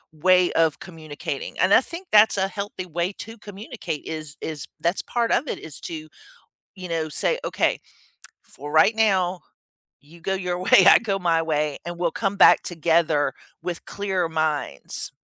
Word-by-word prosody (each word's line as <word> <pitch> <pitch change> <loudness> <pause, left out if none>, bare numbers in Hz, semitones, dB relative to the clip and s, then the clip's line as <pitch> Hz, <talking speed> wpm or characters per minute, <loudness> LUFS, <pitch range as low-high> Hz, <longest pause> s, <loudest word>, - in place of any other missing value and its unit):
way 180 +2 +4
of 160 -2 +2
communicating 155 -5 -7
and 190 +2 +4
I - - +7
think 340 +7 -8
that's 215 -1 +6
a 190 - +1
healthy 200 -2 -6
way 175 +2 -2
to 225 +3 -9
communicate 205 - -7
is 155 -2 -6
is 155 -3 -5
that's 170 +3 0
part 235 -1 -1
of 280 - +1
it, - - -3
is 155 -3 -9
to, 155 -2 -7 0.7
you 185 -1 -8
know, 165 -2 -2
say, 150 - 0
"Okay, - - 0 0.6
for 145 +2 -10
right 160 +8 +5
now, 190 -5 +2 0.6
you 160 +4 -18
go 190 +3 -2
your 180 -2 -2
way, 185 +1 +5
I - - +9
go 200 -4 -2
my 170 -2 +2
way, 150 -2 -1
and 175 0 -6
we'll 175 -1 0
come 200 +1 -2
back - - +7
together 160 -4 +1 0.3
with 175 -2 -4
clearer 190 -4 -2
minds." 155 - -3
175 Hz, 170 wpm, -23 LUFS, 155-195 Hz, 0.7 s, I